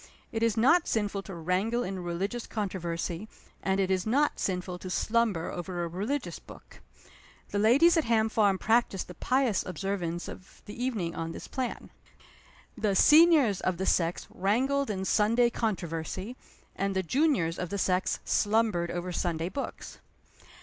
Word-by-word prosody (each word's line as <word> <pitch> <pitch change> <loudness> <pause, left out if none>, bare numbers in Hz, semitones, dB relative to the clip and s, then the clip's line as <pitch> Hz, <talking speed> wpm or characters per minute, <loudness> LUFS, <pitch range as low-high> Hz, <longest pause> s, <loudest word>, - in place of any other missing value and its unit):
It 225 - -3
is 230 -1 +2
not 310 +10 +4
sinful 205 -3 -1
to 195 -2 -9
wrangle 190 +8 0
in 190 -2 -4
religious 190 +7 -3
controversy; 180 -2 -3 0.3
and 190 0 0
it 190 -1 +1
is 185 -1 +1
not 280 +8 +1
sinful 180 -1 -2
to 185 - -7
slumber 215 -4 0
over 175 0 -4
a - - -2
religious 210 - -3
book. - - -15 0.7
The 205 - -1
ladies 275 +11 +5
at 320 - +2
Ham 225 -1 +3
Farm 205 -3 +2
practiced 220 -3 +1
the 180 - -9
pious 255 +2 +1
observance 180 -2 -3
of 185 - -12
the 210 - -8
evening 225 -9 -2
on 165 0 -4
this - - -8
plan. 260 -3 -4 0.8
The 215 -4 0
seniors 295 - +6
of 185 -2 0
the 190 - -2
sex 170 -2 +1
wrangled 260 +8 +1
in 190 -2 -2
Sunday 230 +5 +3
controversy; 190 0 -3 0.4
and 195 0 -1
the 190 - +1
juniors 240 - +1
of 180 - -3
the 200 - -3
sex 185 0 +1
slumbered 210 -5 +1
over 175 +1 -4
Sunday 170 -1 -1
books. 275 - -6
200 Hz, 155 wpm, -29 LUFS, 180-230 Hz, 0.8 s, seniors